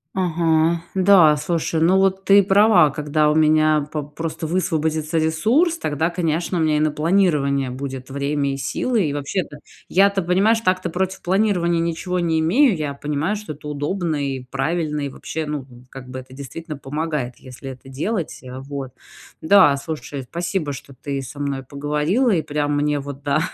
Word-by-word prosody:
Ага. 165 -2 +1
Да, 185 -5 +6
слушай, 160 +1 -1
ну, 180 +4 +4
вот, 190 0 +2
ты 200 +1 +6
права, 195 -5 +5
когда 150 +1 +1
у - - 0
меня 155 -1 +3
по 150 -2 -3
просто 160 +3 -5
высвободится 160 -2 -1
ресурс, 225 - +2
тогда, 155 +3 -1
конечно, 170 +1 -1
у - - +1
меня 155 -1 +2
и - - +1
на 155 0 +2
планирование 150 -5 +1
будет 130 0 -6
время 140 0 -1
и - - -4
силы. 190 - 0
И 145 - -2
вообще-то 145 +2 -3 0.3
я-то, 195 +1 +3
понимаешь, 195 +6 +2
так-то, 185 -3 0
против 190 +2 -2
планирования 180 -3 +1
ничего 170 +2 -2
не 165 -2 +1
имею, 215 - +3
я 150 -2 -3
понимаю, 150 +7 -2
что 210 -7 -6
это 150 +1 -11
удобно 155 +4 -2
и 135 -2 -3
правильно 150 +4 -2
и, 140 - -2
вообще, 155 +3 -5
ну, 150 -3 -4 0.2
как 130 -1 -10
бы, 130 0 -6
это 130 0 -13
действительно 150 +3 -7
помогает, 145 -2 -3
если 130 +1 -9
это 130 +1 -13
делать, 165 +7 -3
а, 125 +1 -7
вот. 135 -1 -6 0.5
Да, 180 -4 +6
слушай, 145 -1 -6
спасибо, 170 -3 -2
что 140 0 -10
ты 140 +1 -5
со 140 +3 -9
мной 140 -2 -2
поговорила 150 - 0
и 175 -7 +2
прям 145 0 -1
мне 145 0 +1
вот, 140 0 -8
да, 145 +1 +1
155 Hz, 175 wpm, -21 LUFS, 140-180 Hz, 0.5 s, Да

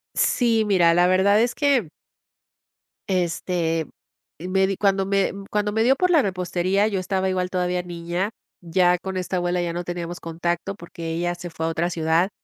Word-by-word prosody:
Sí, 230 -3 +2
mira, 180 -5 +4
la 175 +1 +4
verdad 190 +3 +4
es 240 +1 0
que 275 - +2 1.2
este 170 -3 -1 0.5
me 185 +3 +1
di 195 - -1
cuando 195 -1 +2
me 195 0 +1 0.2
cuando 210 0 0
me 220 +1 +1
dio 260 +3 +4
por 365 +5 +1
la 330 -4 +5
repostería, 185 +1 0
yo 200 -3 -1
estaba 190 +1 -1
igual, 185 -1 -1
todavía 180 -1 -1
niña. 175 +3 -3 0.3
Ya 180 +1 +3
con 190 +1 -5
esta 185 0 -2
abuela 175 0 0
ya 170 -1 -2
no 175 +1 -3
teníamos 175 0 -5
contacto 170 +3 -3
porque 170 -3 -7
ella 175 +1 -1
se 175 0 -8
fue 160 -1 -4
a - - 0
otra 165 +1 -1
ciudad. 165 +2 +1
180 Hz, 180 wpm, -23 LUFS, 175-195 Hz, 1.2 s, la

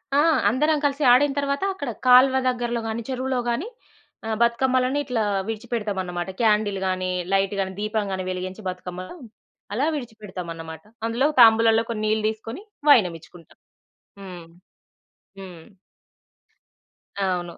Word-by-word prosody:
ఆ! - - +5 0.3
అందరం 300 +7 +2
కలిసి 285 +1 0
ఆడిన 275 +3 +4
తరువాత 280 +3 -1
అక్కడ 285 -8 -5 0.2
కాలువ 255 +1 +7
దగ్గరలో 240 -1 -2
గాని, 220 +1 -3
చెరువులో 260 0 -2
గాని 240 - -2 0.6
ఆ - - -3
బతుకమ్మలని 255 +3 +2
ఇట్లా 245 -4 -1 0.2
విడిచిపెడతామన్నమాట. 205 -6 -4
క్యాండిల్ 210 -3 +2
గాని, 185 0 -1 0.2
లైట్ 195 0 +2
గాని, 190 -1 -2
దీపం 215 0 -1
గాని 190 -1 -3
వెలిగించి 185 +2 -5
బతుకమ్మ 180 0 -7 0.7
అలా 255 +7 0
విడిచిపెడతామన్నమాట. 180 - -8 0.2
అందులో 240 +5 +1
తాంబూలంలో 225 0 +6
కొన్ని 220 -2 -3
నీళ్ళు 215 0 0
తీసుకొని 225 - -7 0.3
వైయానమిచ్చుకుంటాం. 175 - +1 0.6
హ్మ్. 180 -3 -10 0.9
హ్మ్. 180 -4 -11 1.6
అవును. 175 -2 -3
220 Hz, 115 wpm, -23 LUFS, 185-250 Hz, 1.6 s, కాలువ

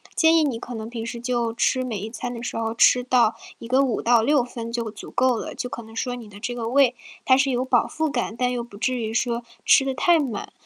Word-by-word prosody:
建 325 0 +5
议 320 - +4
你 250 -6 -1
可 245 - -7
能 220 0 -6
平 230 -2 -5
时 235 0 -6
就 240 -2 -1
吃 255 +2 +1
每 220 -6 -3
一 215 +3 -5
餐 245 +2 -5
的 235 0 -7
时 245 - -4
候 225 0 -2
吃 250 +1 +5
到 240 -3 +3 0.2
一 230 - -10
个 260 +2 +4
5 240 - -1
到 235 -1 +4
6 280 +1 +3
分 235 -1 -7
就 230 -2 -3
足 210 - -10
够 255 -2 +2
了， - - -6
就 250 - -4
可 235 - -6
能 225 0 -14
说 245 +1 -2
你 230 -3 -10
的 205 0 -13
这 245 0 -3
个 230 -2 -3
胃 260 0 +4 0.3
它 260 -1 +5
是 270 0 +2
有 250 +1 0
饱 255 -2 +2
腹 315 0 -2
感， 240 -5 -2
但 250 0 +1
又 245 - -2
不 235 -3 -11
至 250 +5 -1
于 225 -2 -3
说 235 0 -1 0.2
吃 270 - +5
得 270 - -1
太 340 +5 +3
满。 250 -9 -4
245 Hz, 280 characters per minute, -23 LUFS, 230-255 Hz, 0.3 s, 建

